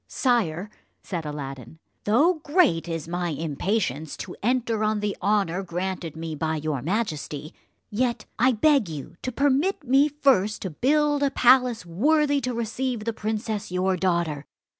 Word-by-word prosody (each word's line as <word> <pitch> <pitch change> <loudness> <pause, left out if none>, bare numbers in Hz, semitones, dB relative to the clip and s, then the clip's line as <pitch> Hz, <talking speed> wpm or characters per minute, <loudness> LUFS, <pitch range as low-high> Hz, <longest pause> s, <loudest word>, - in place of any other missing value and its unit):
"Sire," 210 - 0 0.3
said 170 -5 -4
Aladdin, 135 -1 -7 0.3
"though 310 - +3
great 290 - +3
is 165 -2 -4
my 175 0 -2
impatience 160 - -2
to 180 - -7
enter 230 -1 0
on 215 0 +1
the 205 -1 -2
honour 195 -2 +1
granted 180 -3 -4
me 160 0 -5
by 160 +1 -1
your 155 -3 -2
majesty, 155 - -3 0.4
yet 240 +3 -1
I 255 +2 +4
beg 275 - +3
you 150 0 -7
to 255 - -3
permit 285 +7 +1
me 275 +3 +4
first 265 -8 +2
to 190 - -3
build 290 - +2
a 280 - +3
palace 250 -4 +4
worthy 285 - +2
to 250 -1 -2
receive 235 +1 -2
the 230 - -1
princess 215 -2 -3
your 185 +1 +1
daughter. 170 -5 -1
210 Hz, 150 wpm, -25 LUFS, 165-255 Hz, 0.4 s, I